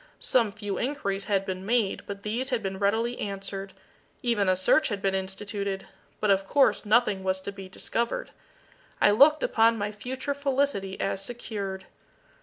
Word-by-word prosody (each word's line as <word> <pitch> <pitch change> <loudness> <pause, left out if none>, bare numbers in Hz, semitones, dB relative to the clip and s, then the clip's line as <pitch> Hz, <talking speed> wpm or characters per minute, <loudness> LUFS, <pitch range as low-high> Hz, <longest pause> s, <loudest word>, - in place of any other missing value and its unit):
Some 230 -5 +2
few 205 -2 -4
inquiries 200 -8 -2
had 195 -2 +1
been 185 -1 -4
made, 220 -1 +1
but 200 0 -6
these 235 +5 -1
had 245 -4 -1
been 190 0 -3
readily 225 +4 +1
answered. 195 -1 -5 0.5
Even 220 -6 +2
a 185 - +4
search 185 +11 +4
had 205 -3 -2
been 195 0 0
instituted 195 +1 -3 0.3
but 210 - +2
of 195 0 +2
course 275 -3 +3
nothing 210 -3 +3
was 190 0 0
to 200 - -5
be 195 -1 -10
discovered. 235 +4 -2 0.7
I 205 - +6
looked 300 +8 +6
upon 230 0 +4
my 205 0 -2
future 260 +6 -4
felicity 275 -9 -1
as 195 0 -1
secured. 200 -4 -5
205 Hz, 165 wpm, -27 LUFS, 195-235 Hz, 0.7 s, I